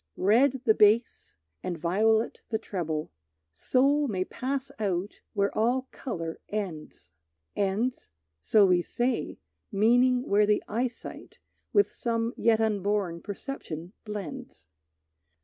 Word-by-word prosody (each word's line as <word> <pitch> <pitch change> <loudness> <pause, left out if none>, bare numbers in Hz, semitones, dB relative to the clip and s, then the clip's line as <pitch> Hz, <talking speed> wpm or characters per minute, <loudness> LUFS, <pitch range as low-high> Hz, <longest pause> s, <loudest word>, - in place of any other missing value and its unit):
Red 245 +7 +3
the 220 - +6
bass 215 - +2 0.2
and 175 -2 -3
violet 220 +7 +1
the 220 - 0
treble, 160 - -4 0.4
Soul 275 - +2
may 185 -5 -1
pass 270 +4 -3
out 195 -1 -2
where 200 0 0
all 250 +4 +1
color 165 -10 -5
ends. 185 -8 -5 0.4
Ends? 205 - -1 0.3
So 205 - +4
we 180 -2 +4
say, 240 +8 -2 0.3
meaning 245 +4 +4
where 205 +1 +4
the 210 0 +2
eyesight 240 +3 -4 0.3
With 410 0 +3
some 230 0 -1
yet 225 -1 +3
unborn 205 -5 0
perception 190 - -6
blends. 195 - -7
210 Hz, 115 wpm, -28 LUFS, 185-245 Hz, 0.4 s, the